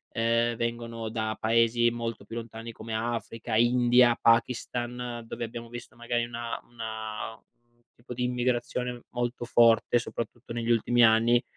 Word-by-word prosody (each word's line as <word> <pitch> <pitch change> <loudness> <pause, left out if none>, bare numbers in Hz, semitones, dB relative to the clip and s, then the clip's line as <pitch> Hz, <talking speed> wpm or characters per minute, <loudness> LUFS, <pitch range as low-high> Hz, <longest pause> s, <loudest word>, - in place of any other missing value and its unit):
ehm, 115 +1 +2
vengono 115 -1 -3
da 110 -1 -2
paesi 115 +1 +3
molto 115 -3 -5
più 115 - -9
lontani 115 0 -7
come 110 +1 -7
Africa, 115 0 -3
India, 120 +1 +5
Pakistan, 120 0 0
dove 115 - -4
abbiamo 115 +1 -8
visto 120 +1 -9
magari 120 0 -1
una 120 0 -5
una 110 -1 -6 0.5
tipo 125 +1 -9
di 125 +1 -3
immigrazione 125 0 -1
molto 120 0 -3
forte, 120 0 +4
soprattutto 120 0 -6
negli 115 0 -3
ultimi 120 +1 +3
anni. 115 +2 +4
120 Hz, 135 wpm, -28 LUFS, 115-120 Hz, 0.5 s, India